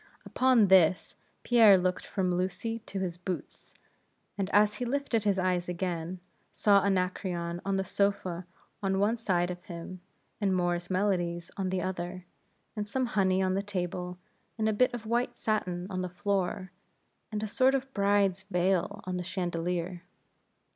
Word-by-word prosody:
Upon 250 -6 +4
this, 185 -2 +4 0.3
Pierre 225 -5 +7
looked 180 0 -1
from 185 -3 0
Lucy 190 +6 -2
to 195 - -5
his 180 -3 -2
boots, 175 -3 -6 0.6
and 195 -2 -2
as 210 0 +4
he 250 - -3
lifted 245 -3 0
his 200 -2 +2
eyes 180 -1 0
again, 180 0 -3 0.3
saw 200 -2 +4
Anacreon 180 -3 -1
on 195 0 0
the 190 - 0
sofa 190 -3 -1 0.3
on 190 -1 0
one 205 +4 +2
side 180 -6 0
of 180 0 -8
him, 175 +1 -8 0.4
and 195 -2 +2
Moore's 175 -1 0
Melodies 175 -3 0
on 190 -2 -2
the 185 -1 -1
other, 180 0 -4 0.5
and 210 -1 -4
some 260 +4 0
honey 190 -1 +3
on 185 0 +1
the 195 - +1
table, 180 -2 -4 0.4
and 220 -1 +1
a 220 - +2
bit 250 +4 +3
of 240 -2 -6
white 235 +3 0
satin 180 -5 -1
on 185 -1 -2
the 180 - -3
floor, 190 -1 -2 0.6
and 210 0 -2
a - - -1
sort 260 +5 +3
of 270 0 -3
bride's 200 -2 +2
veil 190 +3 +1
on 185 0 -3
the 180 - -3
chandelier. 175 -1 -2
190 Hz, 160 wpm, -29 LUFS, 180-205 Hz, 0.6 s, Pierre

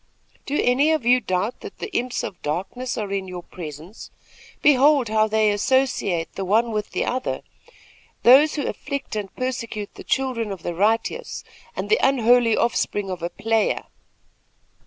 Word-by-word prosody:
'Do 290 - 0
any 265 +5 +3
of 310 -7 0
you 250 +1 +5
doubt 190 +1 -2
that - - -9
the 425 - -7
imps 250 0 -1
of 180 - -6
darkness 190 +12 -3
are 205 -3 -3
in 195 -1 -2
your 180 -1 -7
presence? 165 +4 -9 0.5
Behold 280 -3 +5
how 215 0 +3
they 215 -1 +2
associate 205 -7 0
the 195 - -4
one 225 +5 +2
with 210 -1 -2
the - - -1
other. 255 +1 -2 0.8
Those 275 +5 +7
who 290 - -2
afflict 280 -4 -4
and 205 -2 -4
persecute 230 -5 -4
the - - -11
children 250 -5 -1
of 190 -4 -7
the 175 - -3
righteous, 225 - 0 0.3
and - - -3
the 445 - +3
unholy 245 -3 +4
offspring 205 -4 0
of 180 -2 -5
a 170 - -2
player!' 225 +3 0
225 Hz, 160 wpm, -23 LUFS, 195-255 Hz, 0.8 s, Those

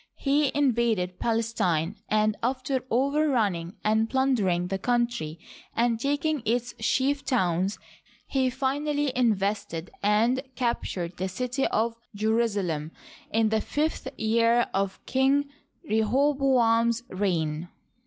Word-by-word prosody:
He 285 0 +2
invaded 235 -10 +1
Palestine, 215 -7 0
and, 215 0 +2
after 260 +1 -1
overrunning 240 - +1
and 220 +1 +2
plundering 225 -10 +1
the 195 0 -2
country 235 -9 -1 0.4
and 235 -1 +2
taking 290 +2 0
its 240 +2 -1
chief 275 +5 +1
towns, 190 - 0 0.5
he 260 -1 +1
finally 285 +2 -1
invested 205 -7 0
and 225 +6 +2
captured 190 -8 -2
the 190 +1 -2
city 250 +6 -1
of 230 +1 0 0.2
Jerusalem 205 -8 0 0.4
in 220 0 +2
the 220 0 +1
fifth 300 +1 -2
year 230 +2 +3
of 195 0 -1
King 270 +2 +2 0.4
Rehoboam's 235 -1 +2
reign. 170 -4 -1
230 Hz, 105 wpm, -27 LUFS, 200-265 Hz, 0.5 s, year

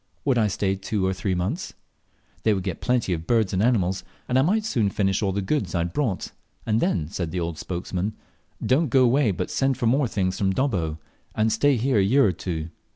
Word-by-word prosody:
Would 130 -4 +3
I 110 - +3
stay 95 0 0
two 95 0 -2
or 95 - +1
three 95 0 -2
months? 95 - -3 0.7
They 110 -2 +3
would 95 - -3
get 90 -3 -3
me - - -11
plenty 125 -7 +1
of 80 0 -5
birds 110 -5 +2
and 95 - +1
animals, 95 -6 +1 0.2
and 125 +1 +2
I - - +5
might 210 +9 +1
soon 115 - +1
finish 95 -1 0
all 100 -2 +1
the 100 +1 -2
goods 145 0 -1
I 85 - +2
had 85 0 -3
brought, 120 -8 -1 0.3
and 110 0 +1
then, 100 - 0
said 85 -1 -4
the 90 +2 -3
old 85 -1 -3
spokesman, 90 +3 -3 0.5
"Don't 140 +4 +2
go 130 +2 +4
away, 125 0 +3
but 95 - -2
send 135 -1 +1
for - - -1
more 130 +4 +3
things 95 -4 -1
from 95 -1 +1
Dobbo, 90 - 0 0.4
and 110 +1 +2
stay 140 +6 +3
here 125 -1 +2
a - - +4
year 130 +7 +4
or 100 - +3
two." 80 -2 -5
100 Hz, 230 wpm, -24 LUFS, 95-125 Hz, 0.7 s, I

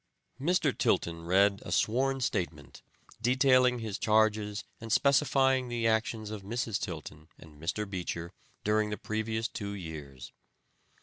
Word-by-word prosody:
Mr. 175 +6 +1
Tilton 85 -1 0
read 100 +3 +3
a - - -7
sworn 135 +4 +1
statement 80 - -3 0.4
detailing 130 0 +4
his 110 -4 -4
charges 105 -1 +2 0.2
and 115 -1 -7
specifying 135 -2 +3
the 120 -1 -1
actions 110 -1 0
of 105 -2 -5
Mrs. 115 +1 -2
Tilton 75 -2 -7
and 75 -2 -15
Mr. 105 +5 -2
Beecher 90 -2 -4 0.3
during 105 0 +2
the 105 - -3
previous 110 +1 -2
two 100 -1 -5
years. 75 -8 -8
110 Hz, 130 wpm, -30 LUFS, 90-120 Hz, 0.4 s, detailing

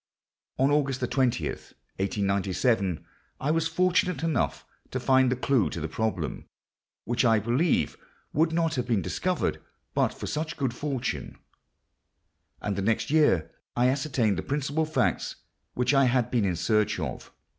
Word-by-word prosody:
On 135 +2 +3
August 140 -3 +1
20, 125 -1 +1
1897, 100 - -1 0.3
I 145 - 0
was 165 0 +1
fortunate 180 0 +1
enough 165 -2 0 0.2
to 130 - -3
find 130 0 +4
the - - +2
clue 130 -3 +2
to - - -5
the 80 - -2
problem—which, 110 +5 -4
I 115 -2 +5
believe, 120 - +1 0.4
would 160 +2 +3
not 165 -1 +1
have 125 -2 -2
been 110 -7 +1
discovered - - -1 0.3
but - - +2
for - - -7
such 155 +2 -3
good 135 -4 -1
fortune; 135 -1 -3 1.2
and 100 - -2
the 100 - -2
next 110 +6 0
year 150 - +3 0.2
I 125 +1 +4
ascertained 130 -7 +1
the - - -1
principal 145 +2 -1
facts 150 -5 0 0.4
which 125 +3 +2
I 135 -1 +5
had 125 -2 +1
been 115 -5 +2
in 90 -2 0
search 105 +4 +1
of. - - -5
125 Hz, 145 wpm, -27 LUFS, 110-145 Hz, 1.2 s, I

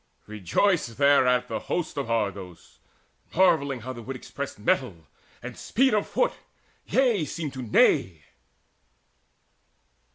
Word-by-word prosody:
Rejoiced 115 - 0
thereat 125 -3 +4
the - - -3
host 175 -3 -3
Of 140 -4 -4
Argos, 100 -6 -4 0.6
marvelling 155 -8 +2
how 130 +3 -6
the 120 - -9
wood 130 +4 -7
expressed - - -7
Mettle, 80 -2 -1 0.4
and - - -7
speed 265 0 +1
of 210 -1 +1
foot - - 0 0.5
yea, 240 -9 +2
seemed 150 0 -5
to 130 - -6
neigh. 95 -7 +2
130 Hz, 120 wpm, -26 LUFS, 110-170 Hz, 0.6 s, thereat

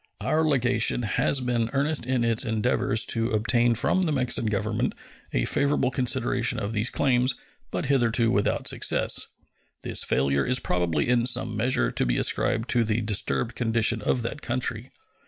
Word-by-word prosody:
Our 145 +9 0
legation 125 -5 +1
has 130 +5 0
been 120 -2 -1
earnest 140 -2 0
in 130 -2 0
its 115 -1 +1
endeavors 110 -1 +1
to 115 0 -1
obtain 115 +2 +2
from 185 +10 0
the - - -1
Mexican 125 -5 0
Government 105 +1 -2 0.4
a - - 0
favorable 140 -2 +1
consideration 125 -1 0
of 100 +2 -4
these 110 +2 +1
claims, 125 -1 +1 0.3
but - - -3
hitherto 120 -3 +2
without 100 +1 0
success. - - +1 0.6
This - - +1
failure 70 +1 +1
is 125 0 +1
probably 85 -7 -1
in 120 -1 +2
some 115 -2 0
measure 110 - 0
to - - 0
be - - 0
ascribed 115 +2 +1
to 120 -2 +2
the 110 +1 -1
disturbed 110 +2 -1
condition 115 -1 +1
of 120 +3 -1
that 130 +5 -5
country. 120 -1 -3
120 Hz, 160 wpm, -25 LUFS, 110-125 Hz, 0.6 s, obtain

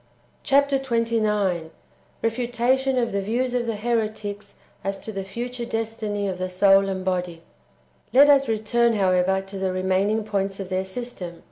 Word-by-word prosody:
Chap. 280 0 +4
xxix. 220 -9 0 0.3
— - - -35
Refutation 245 +3 +1
of 235 -2 +1
the 200 - -1
vietvs 240 +5 -1
of 245 -1 -1
the 225 - -1
heretics 215 -2 -3 0.3
as 195 0 -3
to 220 - -7
the 195 -2 -4
future 240 +5 -4
destiny 220 -3 -3
of 185 -1 -4
the 185 0 -2
soul 195 +1 +4
and 190 -1 -4
body. 180 -3 -2 0.7
1. 275 +3 +7
Let - - +2
us 275 -1 0
return, 230 +2 +2
however, 190 -1 +2
to 195 0 -8
the 190 -1 0
remaining 190 +4 +1
points 195 -2 -2
of 190 -2 -5
their 185 0 -1
system. 190 -5 -6
210 Hz, 165 wpm, -24 LUFS, 190-235 Hz, 0.7 s, 1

